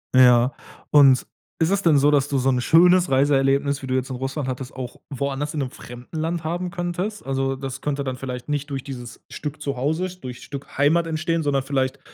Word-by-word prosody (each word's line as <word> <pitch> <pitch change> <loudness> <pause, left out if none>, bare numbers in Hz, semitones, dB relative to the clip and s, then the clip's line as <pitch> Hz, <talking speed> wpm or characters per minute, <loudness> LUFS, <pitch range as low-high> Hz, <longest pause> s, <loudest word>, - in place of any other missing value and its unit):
Ja. 125 0 +6 0.4
Und 135 -3 +6 0.3
ist 165 0 +2
es 200 0 +2
denn 165 -6 +4
so, 145 +2 +4
dass 140 -1 +3
du 140 -1 -1
so 130 +1 +2
'n 125 -1 +1
schönes 180 +5 +5
Reiseerlebnis, 140 +1 +2
wie 130 - -6
du 130 - 0
jetzt 130 0 -1
in - - -3
Russland 135 +2 -3
hattest, 130 0 -5
auch 125 -2 -6
woanders 140 +1 -3
in 155 - -3
'nem 130 -3 -2
fremden 120 +6 -10
Land 165 +1 -2
haben 175 +3 -2
könntest? 175 +5 -3
Also, 135 0 -1
das 135 0 -6
könnte 145 -1 -2
dann 130 -2 -4
vielleicht 125 -2 -6
nicht 145 0 -2
durch 135 -2 -4
dieses 125 -3 -9
Stück 150 0 -6
zu 140 -1 -2
Hause, 160 +8 0
durch 125 -1 -8
Stück 140 -1 -9
Heimat 160 +4 +3
entstehen, 165 +1 -1
sondern 140 -2 +1
vielleicht 135 -1 -1
140 Hz, 215 wpm, -23 LUFS, 130-155 Hz, 0.4 s, Ja